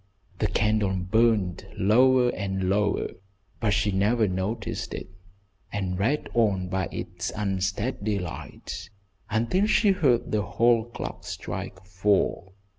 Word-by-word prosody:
The 105 Hz, -, +2 dB
candle 105 Hz, -3 st, +1 dB
burned 95 Hz, -1 st, +1 dB
lower 125 Hz, +5 st, +5 dB
and 95 Hz, -4 st, -2 dB
lower, 105 Hz, +1 st, +1 dB, 0.5 s
but 110 Hz, -, +1 dB
she 105 Hz, 0 st, +2 dB
never 105 Hz, +4 st, +2 dB
noticed 100 Hz, +4 st, -3 dB
it, 95 Hz, -, -7 dB, 0.6 s
and 95 Hz, -2 st, -2 dB
read 135 Hz, +9 st, +1 dB
on 100 Hz, -6 st, +2 dB
by 95 Hz, -1 st, -1 dB
its -, -, -4 dB
unsteady 100 Hz, +2 st, -1 dB
light 90 Hz, 0 st, -7 dB, 0.4 s
until 120 Hz, -, +1 dB
she 215 Hz, -1 st, +4 dB
heard 140 Hz, -11 st, +2 dB
the 105 Hz, -, +2 dB
hall 115 Hz, +2 st, +2 dB
clock 120 Hz, -, -7 dB
strike -, -, -6 dB
four. 95 Hz, 0 st, 0 dB
105 Hz, 120 wpm, -26 LUFS, 95-115 Hz, 0.6 s, lower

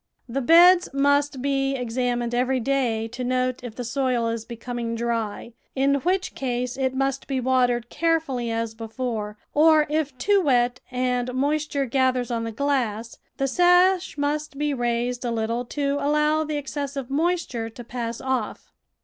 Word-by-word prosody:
The 265 Hz, +3 st, -2 dB
beds 345 Hz, +6 st, +6 dB
must 285 Hz, -1 st, +2 dB
be 275 Hz, -1 st, 0 dB
examined 245 Hz, -1 st, -1 dB
every 255 Hz, +2 st, +1 dB
day 235 Hz, -3 st, 0 dB
to 245 Hz, +2 st, -6 dB
note 255 Hz, 0 st, -1 dB
if 235 Hz, -3 st, -7 dB
the 245 Hz, -, -5 dB
soil 245 Hz, -1 st, 0 dB
is 230 Hz, -1 st, -4 dB
becoming 235 Hz, 0 st, -5 dB
dry, 230 Hz, -1 st, -3 dB, 0.2 s
in 275 Hz, +1 st, +2 dB
which 370 Hz, +3 st, 0 dB
case 250 Hz, -1 st, -2 dB
it 260 Hz, -1 st, -1 dB
must 270 Hz, 0 st, -1 dB
be 270 Hz, -2 st, -1 dB
watered 245 Hz, -2 st, +1 dB
carefully 320 Hz, -8 st, 0 dB
as 225 Hz, -1 st, -2 dB
before, 225 Hz, -2 st, -4 dB, 0.2 s
or 310 Hz, 0 st, +5 dB
if 295 Hz, -4 st, -1 dB
too 400 Hz, +9 st, +3 dB
wet 250 Hz, -5 st, +2 dB
and 250 Hz, -1 st, -1 dB
moisture 285 Hz, +1 st, 0 dB
gathers 255 Hz, -1 st, +1 dB
on 230 Hz, -1 st, -1 dB
the 225 Hz, -, -4 dB
glass, 235 Hz, -3 st, -2 dB, 0.2 s
the 275 Hz, -, 0 dB
sash 355 Hz, +4 st, +3 dB
must 290 Hz, 0 st, -2 dB
be 295 Hz, 0 st, 0 dB
raised 240 Hz, 0 st, -1 dB
a 245 Hz, -, -1 dB
little 230 Hz, +1 st, -1 dB
to 280 Hz, +2 st, -1 dB
allow 300 Hz, +2 st, +2 dB
the 305 Hz, 0 st, -3 dB
exces 280 Hz, 0 st, -4 dB
sive 270 Hz, -2 st, -5 dB
moisture 295 Hz, -7 st, -1 dB
to 240 Hz, +2 st, -10 dB
pass 235 Hz, -1 st, -5 dB
off. 260 Hz, -4 st, -3 dB
255 Hz, 160 wpm, -24 LUFS, 240-285 Hz, 0.2 s, beds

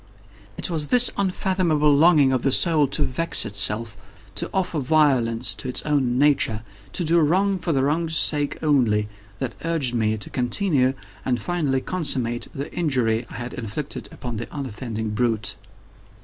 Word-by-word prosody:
It -, -, -2 dB
was 155 Hz, -3 st, -1 dB
this 245 Hz, +5 st, +5 dB
unfathomable 185 Hz, -6 st, +1 dB
longing 150 Hz, -3 st, +4 dB
of 130 Hz, -, 0 dB
the 135 Hz, -, 0 dB
soul 155 Hz, -1 st, +4 dB
to -, -, -2 dB
vex 165 Hz, 0 st, +1 dB
itself—to 100 Hz, 0 st, +1 dB
offer 180 Hz, -4 st, -2 dB
violence 130 Hz, -5 st, +2 dB
to 130 Hz, -, -6 dB
its 125 Hz, -, -1 dB
own 135 Hz, -5 st, 0 dB
nature—to 110 Hz, -, 0 dB
do 170 Hz, +1 st, +2 dB
wrong 190 Hz, +5 st, +1 dB
for 170 Hz, -1 st, -2 dB
the 135 Hz, -3 st, +1 dB
wrong's 160 Hz, +3 st, 0 dB
sake 145 Hz, -2 st, +1 dB
only—that 105 Hz, -4 st, -1 dB
urged 165 Hz, -7 st, -1 dB
me 110 Hz, -2 st, 0 dB
to 105 Hz, -, -8 dB
continue 130 Hz, -, 0 dB, 0.3 s
and 125 Hz, -2 st, -1 dB
finally 140 Hz, -1 st, -1 dB
to -, -, -18 dB
consummate 130 Hz, -9 st, -1 dB
the 140 Hz, +1 st, -7 dB
injury 125 Hz, -8 st, -1 dB
I -, -, -10 dB
had 120 Hz, +1 st, -6 dB
inflicted 125 Hz, +5 st, -6 dB
upon 120 Hz, -3 st, -7 dB
the 115 Hz, -, -7 dB
unoffending 110 Hz, -5 st, -5 dB
brute. 110 Hz, -1 st, -1 dB
135 Hz, 150 wpm, -22 LUFS, 115-160 Hz, 0.3 s, this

